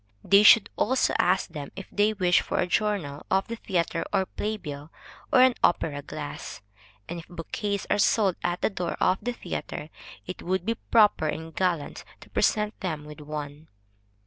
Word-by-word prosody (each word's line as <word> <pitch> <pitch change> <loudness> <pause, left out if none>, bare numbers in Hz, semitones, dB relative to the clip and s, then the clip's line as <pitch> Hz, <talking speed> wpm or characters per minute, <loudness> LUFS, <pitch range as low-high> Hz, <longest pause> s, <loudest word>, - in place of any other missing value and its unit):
They 200 +1 +6
should 215 +1 +7
also 260 +1 +2
ask 185 0 +2
them 145 -3 -7
if 195 - -7
they 210 +1 +2
wish 180 -4 +3
for - - -3
a - - +2
journal 180 -7 -1
of 190 +1 +1
the 230 - -5
theatre 170 -5 -1
or 195 -2 +2
play 215 +3 -3
bill, 150 -3 -8 0.4
or 255 - +6
an 260 0 +6
opera 150 -4 +2
glass; 145 -6 -7 0.4
and 175 0 -5
if 165 - -12
bouquets 195 +4 -4
are 205 - +1
sold 200 -3 +3
at 175 0 -1
the - - +2
door 175 -3 -3
of 185 +1 +2
the 245 - -2
theatre, 155 -8 -6 0.4
it 185 - -7
would 185 0 -1
be 230 - +1
proper 215 -7 +3
and 160 +1 -4
gallant 175 -5 -1 0.2
to - - -15
present 210 0 +1
them 155 -6 -4
with 150 +1 -10
one. 150 0 -7
180 Hz, 180 wpm, -26 LUFS, 155-205 Hz, 0.4 s, should